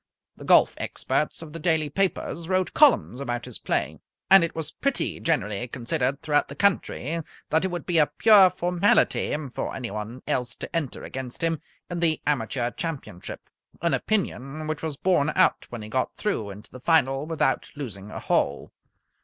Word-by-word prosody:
The -, -, -11 dB
golf -, -, +6 dB
experts 150 Hz, +2 st, -2 dB
of 155 Hz, -2 st, -11 dB
the 165 Hz, -, -6 dB
daily 160 Hz, -2 st, +1 dB
papers 170 Hz, 0 st, -2 dB
wrote 185 Hz, -1 st, +1 dB
columns 275 Hz, -, +4 dB
about 120 Hz, -3 st, -3 dB
his 125 Hz, -3 st, -7 dB
play. -, -, -1 dB, 0.3 s
And 195 Hz, -2 st, +9 dB
it 170 Hz, -, -2 dB
was 160 Hz, -1 st, -4 dB
pretty 275 Hz, -1 st, -1 dB
generally 120 Hz, -8 st, -1 dB
considered 130 Hz, +3 st, -2 dB
throughout 145 Hz, -2 st, +2 dB
the 140 Hz, -, -9 dB
country 170 Hz, -4 st, 0 dB, 0.3 s
that 160 Hz, +4 st, +3 dB
it -, -, +2 dB
would 175 Hz, -1 st, -5 dB
be 170 Hz, -3 st, +2 dB
a 150 Hz, -, +5 dB
pure 205 Hz, -4 st, +6 dB
formality 180 Hz, -3 st, +2 dB, 0.2 s
for -, -, -3 dB
anyone 115 Hz, 0 st, -5 dB
else 120 Hz, -2 st, -1 dB
to -, -, -7 dB
enter 150 Hz, -6 st, -2 dB
against 130 Hz, +2 st, -6 dB
him 165 Hz, -2 st, 0 dB, 0.3 s
in 175 Hz, -1 st, -4 dB
the 165 Hz, -2 st, +2 dB
Amateur 125 Hz, -3 st, 0 dB
Championship 145 Hz, -, -6 dB, 0.4 s
an 170 Hz, -, +2 dB
opinion 155 Hz, -, -1 dB
which 155 Hz, 0 st, -3 dB
was 155 Hz, -3 st, -4 dB
borne 175 Hz, -5 st, +2 dB
out -, -, +3 dB
when 120 Hz, -3 st, -7 dB
he -, -, -7 dB
got 130 Hz, +4 st, -1 dB
through 155 Hz, -, -2 dB
into 100 Hz, +2 st, -11 dB
the 130 Hz, -, -10 dB
final 140 Hz, -2 st, +2 dB
without 165 Hz, -1 st, 0 dB
losing 105 Hz, -9 st, -7 dB
a -, -, -6 dB
hole. 70 Hz, -, 0 dB
150 Hz, 175 wpm, -25 LUFS, 125-170 Hz, 0.4 s, And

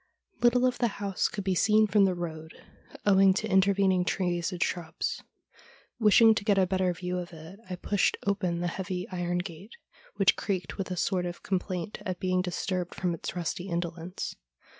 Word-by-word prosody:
Little 245 Hz, +1 st, +4 dB
of 255 Hz, -, 0 dB
the 240 Hz, -, +3 dB
house 200 Hz, -2 st, 0 dB
could 200 Hz, -, -5 dB
be 190 Hz, 0 st, +1 dB
seen 215 Hz, +4 st, +4 dB
from 205 Hz, -1 st, +4 dB
the 185 Hz, -1 st, +1 dB
road, 160 Hz, -2 st, -6 dB, 0.5 s
owing 195 Hz, -1 st, +5 dB
to 220 Hz, -, -1 dB
intervening 190 Hz, -1 st, +3 dB
trees 175 Hz, -1 st, -1 dB
and 180 Hz, -1 st, 0 dB
shrubs. 170 Hz, -1 st, -3 dB, 0.8 s
Wishing 220 Hz, +1 st, +7 dB
to 215 Hz, -, -2 dB
get 205 Hz, -2 st, +2 dB
a 190 Hz, -, +5 dB
better 185 Hz, 0 st, +1 dB
view 180 Hz, +1 st, -3 dB
of 175 Hz, -1 st, -7 dB
it, 165 Hz, +5 st, -11 dB
I 180 Hz, -, -3 dB
pushed 200 Hz, +2 st, +1 dB
open 185 Hz, -4 st, 0 dB
the 175 Hz, -, 0 dB
heavy 185 Hz, +1 st, -4 dB
iron 175 Hz, -1 st, -1 dB
gate, 180 Hz, +4 st, -7 dB, 0.4 s
which 195 Hz, -2 st, +4 dB
creaked 190 Hz, 0 st, -3 dB
with 190 Hz, -, -3 dB
a 180 Hz, -, -3 dB
sort 180 Hz, 0 st, 0 dB
of 175 Hz, -, -7 dB
com 190 Hz, -2 st, +1 dB
plaint 185 Hz, +2 st, -5 dB
at 185 Hz, -1 st, -4 dB
being 185 Hz, -1 st, +1 dB
disturbed 180 Hz, 0 st, -3 dB
from 180 Hz, -1 st, -1 dB
its 165 Hz, -, -5 dB
rusty 175 Hz, +2 st, -3 dB
indolence. 170 Hz, +1 st, -4 dB
185 Hz, 185 wpm, -28 LUFS, 175-200 Hz, 0.8 s, Wishing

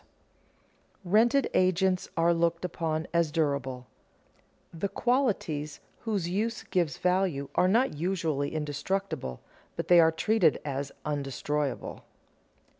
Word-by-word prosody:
[Sidenote: 175 Hz, -, -8 dB
Rented 240 Hz, +6 st, +4 dB
agents 185 Hz, 0 st, +2 dB
are 170 Hz, +1 st, +4 dB
looked 170 Hz, +1 st, 0 dB
upon 160 Hz, -2 st, -2 dB
as 170 Hz, -2 st, +2 dB
durable] 140 Hz, -5 st, -1 dB, 0.9 s
The 170 Hz, +4 st, -2 dB
qualities 200 Hz, -, 0 dB, 0.2 s
whose 205 Hz, -7 st, -2 dB
use 215 Hz, +6 st, -2 dB
gives 170 Hz, -7 st, -1 dB
value 180 Hz, -7 st, 0 dB
are 180 Hz, -, +3 dB
not 235 Hz, +7 st, +3 dB
usually 160 Hz, -3 st, -1 dB
indestructible, 150 Hz, -, -3 dB, 0.3 s
but -, -, -4 dB
they 175 Hz, -1 st, +8 dB
are 160 Hz, -1 st, +6 dB
treated 170 Hz, 0 st, +2 dB
as 140 Hz, -1 st, -3 dB
undestroyed. 145 Hz, -1 st, -2 dB
170 Hz, 115 wpm, -28 LUFS, 150-190 Hz, 0.9 s, they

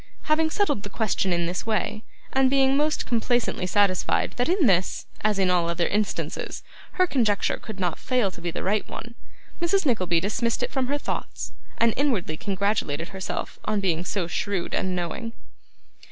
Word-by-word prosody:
Having 315 Hz, +1 st, +3 dB
settled 315 Hz, -, +1 dB
the 205 Hz, -, -7 dB
question 200 Hz, -3 st, 0 dB
in 175 Hz, -1 st, +1 dB
this 175 Hz, +1 st, -2 dB
way, 215 Hz, 0 st, -1 dB, 0.3 s
and 265 Hz, 0 st, +4 dB
being 270 Hz, 0 st, +4 dB
most 300 Hz, +2 st, +1 dB
complacently 235 Hz, -5 st, +1 dB
satisfied 195 Hz, -2 st, +2 dB
that 245 Hz, +5 st, +1 dB
in 360 Hz, -3 st, +3 dB
this, 185 Hz, -4 st, +2 dB, 0.2 s
and 215 Hz, -1 st, +2 dB
in 190 Hz, -2 st, +3 dB
all 175 Hz, -2 st, +2 dB
other 170 Hz, 0 st, +1 dB
instances, 210 Hz, 0 st, -2 dB, 0.3 s
her 370 Hz, -, +4 dB
conjecture 230 Hz, -, +1 dB
could 220 Hz, -4 st, -8 dB
not 180 Hz, -3 st, -1 dB
fail 250 Hz, -7 st, +1 dB
to 175 Hz, -, -12 dB
be 175 Hz, -, -2 dB
the 170 Hz, -, -4 dB
right 205 Hz, +2 st, 0 dB
one, 235 Hz, +1 st, -7 dB, 0.5 s
Mrs. 365 Hz, +2 st, +2 dB
Nickleby 185 Hz, -, +2 dB
dismissed 220 Hz, +5 st, 0 dB
it -, -, -2 dB
from 265 Hz, -2 st, 0 dB
her 285 Hz, +2 st, +1 dB
thoughts, -, -, -4 dB, 0.3 s
and 230 Hz, -1 st, +4 dB
inwardly 235 Hz, -, +1 dB
congratulated 190 Hz, -4 st, -1 dB
herself 190 Hz, -1 st, -4 dB
on 215 Hz, -1 st, +1 dB
being 175 Hz, -4 st, +1 dB
so 185 Hz, 0 st, -1 dB
shrewd 185 Hz, +1 st, -2 dB
and 185 Hz, -1 st, 0 dB
knowing. 180 Hz, +7 st, -3 dB
210 Hz, 175 wpm, -25 LUFS, 185-255 Hz, 0.5 s, and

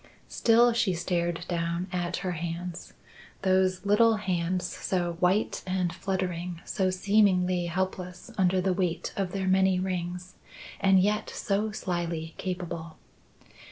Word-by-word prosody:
Still 235 Hz, +1 st, +4 dB
she 200 Hz, -5 st, +1 dB
stared 175 Hz, 0 st, -1 dB
down 170 Hz, 0 st, -1 dB
at 175 Hz, -1 st, -1 dB
her 180 Hz, -, 0 dB
hands 170 Hz, +1 st, -5 dB, 0.5 s
those 185 Hz, 0 st, +2 dB
little 220 Hz, +3 st, +5 dB
hands 180 Hz, -3 st, -1 dB
so 175 Hz, -1 st, -2 dB
white 185 Hz, +4 st, +2 dB
and 185 Hz, -2 st, 0 dB
fluttering, 180 Hz, -3 st, -3 dB
so 190 Hz, -1 st, 0 dB
seemingly 185 Hz, -2 st, +2 dB
helpless 180 Hz, +3 st, -4 dB
under 185 Hz, -1 st, +3 dB
the 185 Hz, 0 st, +1 dB
weight 180 Hz, -2 st, -1 dB
of 190 Hz, -3 st, -2 dB
their 190 Hz, 0 st, -2 dB
many 190 Hz, 0 st, +3 dB
rings, 180 Hz, -1 st, -3 dB, 0.5 s
and 195 Hz, -1 st, +5 dB
yet 210 Hz, +3 st, +1 dB
so 210 Hz, +2 st, -1 dB
slyly 170 Hz, -5 st, -3 dB
capable. 170 Hz, -3 st, -5 dB
185 Hz, 125 wpm, -28 LUFS, 175-190 Hz, 0.5 s, little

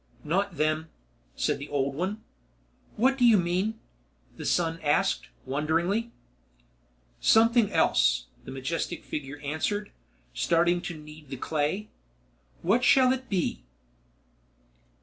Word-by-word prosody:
"Not 185 Hz, +2 st, -1 dB
them," 155 Hz, +1 st, 0 dB, 0.5 s
said -, -, 0 dB
the 145 Hz, -, -7 dB
old 140 Hz, -1 st, 0 dB
one. 190 Hz, +8 st, -3 dB, 0.7 s
"What 265 Hz, +4 st, +2 dB
do -, -, +2 dB
you 230 Hz, -3 st, +7 dB
mean?" 185 Hz, +5 st, 0 dB, 0.6 s
the -, -, -5 dB
son 165 Hz, -1 st, +1 dB
asked, 145 Hz, -1 st, +1 dB, 0.2 s
wonderingly. 170 Hz, -, 0 dB, 1.1 s
"Something 230 Hz, -1 st, +4 dB
else," -, -, +3 dB, 0.2 s
the -, -, -10 dB
majestic 145 Hz, +6 st, -3 dB
figure 145 Hz, -1 st, -5 dB
answered, 200 Hz, +8 st, -2 dB, 0.4 s
starting 175 Hz, +1 st, +2 dB
to 175 Hz, -3 st, -6 dB
knead 150 Hz, -1 st, -13 dB
the 135 Hz, -, -5 dB
clay. 155 Hz, -, -2 dB, 0.7 s
"What 225 Hz, +8 st, +3 dB
shall 260 Hz, -1 st, +6 dB
it 260 Hz, 0 st, -6 dB
be?" 185 Hz, -4 st, -1 dB
170 Hz, 115 wpm, -27 LUFS, 150-210 Hz, 1.1 s, you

